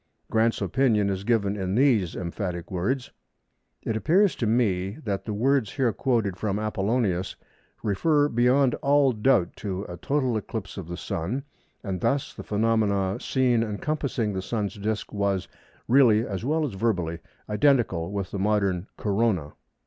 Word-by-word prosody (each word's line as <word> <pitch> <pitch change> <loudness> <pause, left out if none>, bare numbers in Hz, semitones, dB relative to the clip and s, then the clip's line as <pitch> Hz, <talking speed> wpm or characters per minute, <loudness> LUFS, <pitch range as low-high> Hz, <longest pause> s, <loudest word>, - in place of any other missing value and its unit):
Grant's 110 0 +2
opinion 105 0 +2
is 95 0 -3
given 105 -3 +1
in 95 -1 -2
these 115 - +3
emphatic 90 -1 -4
words:—"It 115 +2 -5
appears 170 - +3
to 115 - -1
me 100 -4 +1
that 100 -4 -3
the 110 - -3
words 125 -1 +1
here 125 -5 +1
quoted 115 -8 0
[from 100 0 -1
Apollonius] 105 -3 -1 0.5
refer 145 - +2
beyond 125 +1 +3
all 140 -1 +4
doubt 110 -5 +2
to 95 -2 -4
a 90 -3 -8
total 130 -3 0
eclipse 105 -2 -5
of 95 -5 -7
the 85 0 -5
Sun, 100 +12 -3 0.4
and 95 -5 -3
thus 140 0 0
the - - -8
phenomenon 105 -3 +1
seen 125 -3 +2
encompassing 115 0 -2
the 95 - -2
Sun's 105 0 -2
disc 105 +2 -3
was, 100 -2 0 0.4
really 115 -3 +5
as 100 0 -4
well 155 +4 +1
as 135 - -4
verbally, 90 -6 -1 0.3
identical 105 - +2
with 100 -2 -3
the 100 - -3
modern 100 -2 +1
Corona." 100 -7 0
105 Hz, 150 wpm, -26 LUFS, 95-125 Hz, 0.5 s, really